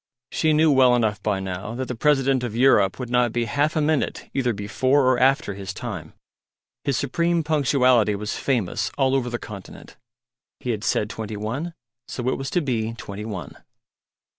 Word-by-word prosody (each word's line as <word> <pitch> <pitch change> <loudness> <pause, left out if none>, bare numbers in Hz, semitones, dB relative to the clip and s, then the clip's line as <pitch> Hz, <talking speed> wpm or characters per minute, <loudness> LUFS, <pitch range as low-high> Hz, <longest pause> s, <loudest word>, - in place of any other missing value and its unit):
She 160 - +2
knew 155 0 +4
well 130 -3 +5
enough 110 -3 0
by 105 -2 0
now 95 +4 -5
that 130 +1 -3
the - - -3
President 135 0 +2
of 115 -3 -4
Europe 115 -6 +4
would 125 -2 -6
not 125 -2 +3
be 120 0 0
half 145 +6 0
a 155 - +2
minute 150 -1 -1
either 130 -3 +1
before 130 +7 +1
or 130 -1 +3
after 135 -4 +3
his 95 0 -7
time. 110 -10 -6 0.7
His 140 -4 0
supreme 170 +5 0
punctuality 130 -8 +3
was 105 +1 -4
famous 110 -5 -1
all 135 -1 +2
over 130 -2 +1
the 120 - -2
continent. 100 -5 -11 0.6
He 125 - -2
had 110 -2 -3
said 105 - +1
Twenty 110 -1 -6
One, 135 +11 -4 0.3
so 125 -1 -4
it - - -1
was 135 0 -3
to 180 - +1
be 115 -6 -1
twenty 105 -1 -7
one. 95 -9 -7
125 Hz, 185 wpm, -23 LUFS, 105-135 Hz, 0.7 s, well